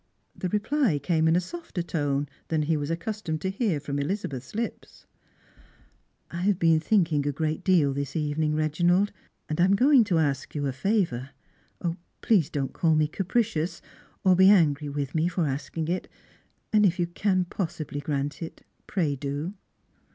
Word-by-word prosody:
The 185 - -3
reply 210 - +1
came 160 +3 +1
in 160 - +4
a - - +4
softer 185 - -5
tone 145 -4 -1 0.2
than 155 -2 0
he 160 +2 +1
was 145 -1 -2
accustomed 165 -1 -3
to 190 - -1
hear 195 - 0
from 140 0 -3
Elizabeth's 140 - -4
lips. 230 +1 -5 0.6
" - - -31 0.5
I 170 - -5
have 195 0 +2
been 165 -2 +4
thinking 160 -5 +2
a - - +2
great 155 +2 -2
deal 165 -8 +3
this 140 +3 -4
evening, 150 0 0
Reginald 175 +6 +2 0.4
and 155 +2 -1
I - - +6
am 195 +1 +4
going 260 +3 +6
to 175 -4 +1
ask 145 -4 -1
you 145 -1 -1
a 135 - 0
favour. 135 - 0 0.9
Please 190 -10 +3
don't 135 -2 -3
call 165 -2 +2
m' 155 - +3
capricious^ 195 -2 -1 0.4
or 185 -1 +5
be 190 +1 +7
angry 150 -7 +4
with 140 -1 -3
me 160 +1 +2
for 175 -2 0
asking 145 +3 -3
it; 180 +2 -2 0.7
and 210 -1 +5
if 180 -3 +3
you 175 - +1
car 185 +1 0
possibly 160 -5 -4
grant 145 +1 -3
it, 165 - -8 0.2
pray 160 -7 0
do." 145 +6 -4
160 Hz, 175 wpm, -26 LUFS, 145-190 Hz, 0.9 s, be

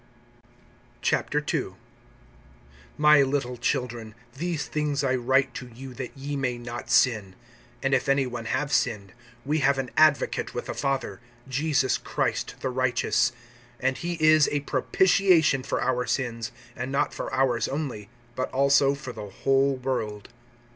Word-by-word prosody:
II. - - -2 1.2
MY 150 -1 +6
little 135 -2 0
children, 120 -2 -3 0.2
these 165 +1 -2
things 150 -1 -1
I 130 -1 +1
write 130 +2 +2
to 125 - -7
you, 125 +2 -10
that 130 +2 -7
ye 140 +2 -4
may 125 -3 -1
not 120 0 -7
sin. 110 -6 +2 0.5
And 135 0 +1
if 135 +1 +1
any 135 0 +3
one 120 -2 -6
have 140 +4 -1
sinned, 100 -3 0 0.3
we 150 +3 +1
have 140 -1 +3
an 130 -2 -3
advocate 155 -2 +3
with - - -3
the - - -4
Father, 135 -3 -2 0.3
Jesus 135 0 +1
Christ - - -2
the 130 - -1
righteous. 125 -1 +1 0.5
(2)And 130 0 +1
he 175 0 -3
is 155 -1 +5
a 145 - 0
propitiation 160 +1 +3
for - - -2
our 125 0 0
sins; 115 -2 -2 0.2
and 125 +2 -4
not 140 - 0
for - - -5
ours 125 -3 +1
only, 130 -8 -4 0.3
but 130 - -2
also 140 +1 +4
for 135 -3 -8
the 105 -2 -8
whole 135 +6 +2
world. 125 -6 -3
130 Hz, 145 wpm, -26 LUFS, 120-140 Hz, 1.2 s, MY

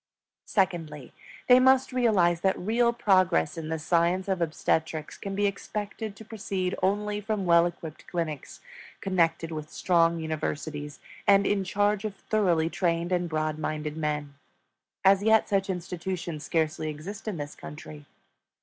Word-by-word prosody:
Secondly, 165 - -1 0.3
they 250 0 +8
must 260 0 +4
realize 190 -9 +3
that 190 0 +2
real 235 +5 +2
progress 185 - +2
in 160 -1 -5
the 160 - -1
science 170 +4 +1
of 190 -2 -1
obstetrics 160 -1 -1
can 195 -1 -6
be 205 +1 +1
expected 205 +1 -4
to 220 - -12
proceed 195 -4 -3
only 205 +2 0
from 210 -2 -2
well 170 0 +5
equipped 165 -3 -9
clinics 160 -5 -4 0.4
connected 165 -3 +1
with 155 -1 -6
strong 170 -2 +2
universities, 150 -2 -4 0.3
and 200 0 +6
in 195 -1 +1
charge 205 +2 +1
of 215 -2 -4
thoroughly 185 -6 +1
trained 170 0 -1
and 175 -1 0
broad 155 -1 -1
minded 155 -1 -3
men. 150 -2 -2 0.7
As 195 0 +6
yet 220 +1 +4
such 195 0 0
institutions 175 -3 -4
scarcely 155 -1 -1
exist 165 +9 -8
in 205 -5 -2
this 145 -1 -5
country. 150 -1 -10
175 Hz, 145 wpm, -27 LUFS, 155-200 Hz, 0.7 s, they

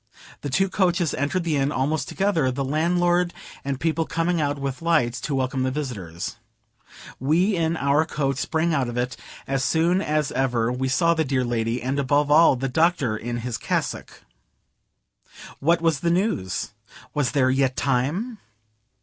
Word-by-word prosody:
The 145 - -4
two 190 +9 +2
coaches 175 -4 +1
entered 145 +6 -1
the 160 -3 0
inn 135 +1 +1
almost 145 +1 -1
together; 190 -9 +1
the 135 +2 -2
landlord 175 +4 +1 0.3
and 140 -1 -3
people 160 +1 0
coming 165 0 0
out 145 -1 0
with 135 0 -4
lights 130 -9 +1
to 140 - -2
welcome 130 0 -1
the 130 - +1
visitors. 110 - -5 0.8
We 170 - +2
in 165 -1 0
our 140 +2 +3
coach 135 -4 -1
sprang 160 +3 0
out 135 -4 +1
of 120 - -5
it, 125 +1 -1 0.3
as 135 -1 -1
soon 170 +6 +2
as 150 -4 0
ever 120 -3 0
we 130 +1 -1
saw 170 +5 +3
the 160 -1 +1
dear 135 -3 0
lady, 120 0 -1
and 135 +2 -1
above 145 +2 +2
all, 155 -2 +6
the 135 +2 -2
Doctor 140 -5 +1
in 120 +2 -4
his 120 -1 -4
cassock. - - -3 1.4
What 170 +3 +2
was 160 -4 +2
the 170 - 0
news? 170 - -1 0.4
Was 145 -4 0
there 130 -2 +3
yet 135 -1 +1
time? 150 - -1
145 Hz, 165 wpm, -24 LUFS, 130-165 Hz, 1.4 s, all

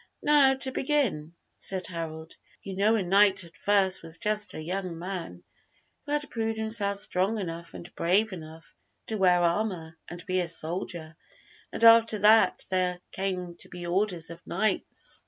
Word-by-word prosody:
"Now 285 -3 +5
to 265 0 +1
begin," 255 - 0 0.2
said 185 -2 -2
Harold, 160 -2 -6 0.3
"you 195 -1 -6
know 210 +4 +3
a 210 - 0
knight 195 +1 +4
at 165 -1 -14
first 190 +1 +2
was 165 0 -8
just 210 +2 -1
a 155 - -5
young 180 0 -4
man 170 - -6 0.6
who 290 - -1
had 295 0 0
proved 225 -1 -2
himself 220 -2 0
strong 200 +2 0
enough 170 -4 -6
and 175 - -10
brave 195 +5 +1
enough 160 -1 -11 0.3
to 220 - -3
wear 180 -2 +4
armor 170 -3 -1
and 175 0 -9
be 185 -1 0
a 175 - 0
soldier, 165 0 -4 0.6
and - - -4
after 230 -1 +7
that 215 +2 +4
there 180 -1 0
came 185 -2 -3
to - - -9
be 175 -1 -8
orders 175 -2 -1
of 170 0 -10
knights. 215 +5 -2
185 Hz, 165 wpm, -27 LUFS, 170-215 Hz, 0.6 s, after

